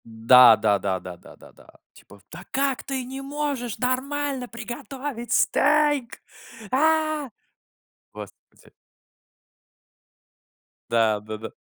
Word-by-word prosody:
Да 115 +1 +6
да 105 -2 +1
да 95 -1 -2
да 90 -1 -9
да - - -16
да - - -17
да! - - -20 0.3
Типа: 100 +1 -18
"Да 180 +3 -10
как 270 -1 -1
ты 270 -2 -4
не 265 +2 -7
можешь 275 -5 -4
нормально 265 +1 -2
приготовить 240 +2 -7
стейк, 290 -4 +1 0.5
а!" 310 0 +1 0.8
Господи. - - -14 2.2
Да, 110 -2 +2
да-да. 110 +1 -8
250 Hz, 105 wpm, -24 LUFS, -, 2.2 s, Да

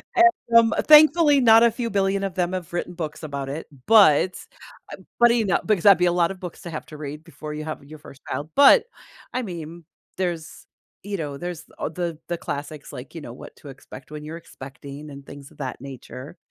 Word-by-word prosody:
And, 345 -10 +4
um, 225 -1 +2
thankfully, 300 -1 +7
not 225 -1 +7
a 235 - +5
few 235 -1 -4
billion 195 -1 0
of 195 -3 -3
them 180 0 -1
have 180 -3 -5
written 175 0 -3
books 160 -2 -6
about 140 -2 -5
it, 155 +4 -5 0.2
but 190 -5 +5 0.6
uh, - - -17 0.2
but, 240 0 +6
you 225 -3 +1
know 190 - +2
because 205 -6 +1
that'd 200 -2 +8
be 180 - +2
a 175 - +3
lot 175 0 +1
of 190 - -9
books 180 -2 -8
to 170 - -7
have 155 - -6
to 155 - -11
read 150 +1 -7
before 155 -3 -9
you 155 0 -5
have 155 - -6
your 155 +1 -12
first 135 -2 -15
child, 150 +2 -4
but, 285 - +7 0.5
I 255 - -1
mean, 170 -3 -8 0.3
there's 175 -3 -4 0.4
you 205 0 -4
know, 145 -3 -5
there's 175 -1 -6 0.2
a - - -2
the 170 -1 -4
the 175 - -2
classics 145 0 -6
like, 130 +6 -10
you 165 - -6
know, 120 - -9
What - - -12
to 145 - -12
Expect 135 +1 -13
When 150 0 -7
You're 160 +2 -7
Expecting 140 -1 -11
and 140 -1 -11
things 140 -1 -12
of - - -21
that 130 -2 -5
nature. 135 +2 -10
170 Hz, 220 wpm, -23 LUFS, 150-195 Hz, 0.6 s, that'd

